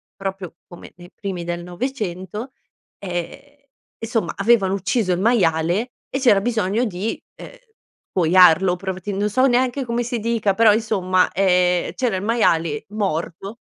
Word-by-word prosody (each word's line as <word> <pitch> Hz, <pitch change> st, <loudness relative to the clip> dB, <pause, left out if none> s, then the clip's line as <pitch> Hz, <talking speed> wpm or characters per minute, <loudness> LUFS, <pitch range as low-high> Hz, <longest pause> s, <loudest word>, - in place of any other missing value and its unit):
proprio 195 Hz, -3 st, -6 dB
come 175 Hz, -, -13 dB
nei 175 Hz, +1 st, -15 dB
primi 190 Hz, -4 st, -5 dB
del 175 Hz, 0 st, -4 dB
'900, 210 Hz, +2 st, -5 dB, 0.5 s
ehm, 200 Hz, +11 st, -6 dB, 0.4 s
insomma, 225 Hz, -6 st, -2 dB
avevano 200 Hz, -2 st, +3 dB
ucciso 200 Hz, +1 st, 0 dB
il 175 Hz, -, 0 dB
maiale, 190 Hz, 0 st, +1 dB, 0.2 s
e 270 Hz, -, -3 dB
c'era 240 Hz, -7 st, +4 dB
bisogno 220 Hz, +1 st, 0 dB
di, 200 Hz, +2 st, -4 dB, 0.2 s
uhm, -, -, -9 dB, 0.6 s
scuoiarlo 180 Hz, +1 st, +5 dB
provettendo 195 Hz, +2 st, -3 dB
so 255 Hz, +5 st, +2 dB
neanche 255 Hz, +2 st, +1 dB
come 235 Hz, +1 st, -1 dB
si 240 Hz, 0 st, -3 dB
dica, 220 Hz, -3 st, 0 dB
però 225 Hz, +1 st, +5 dB
insomma, 190 Hz, -5 st, +1 dB
ehm, 180 Hz, -2 st, +2 dB
c'era 245 Hz, -6 st, 0 dB
il 185 Hz, -, -3 dB
maiale 170 Hz, -9 st, +1 dB
morto 195 Hz, 0 st, -3 dB
195 Hz, 135 wpm, -21 LUFS, 180-230 Hz, 0.6 s, scuoiarlo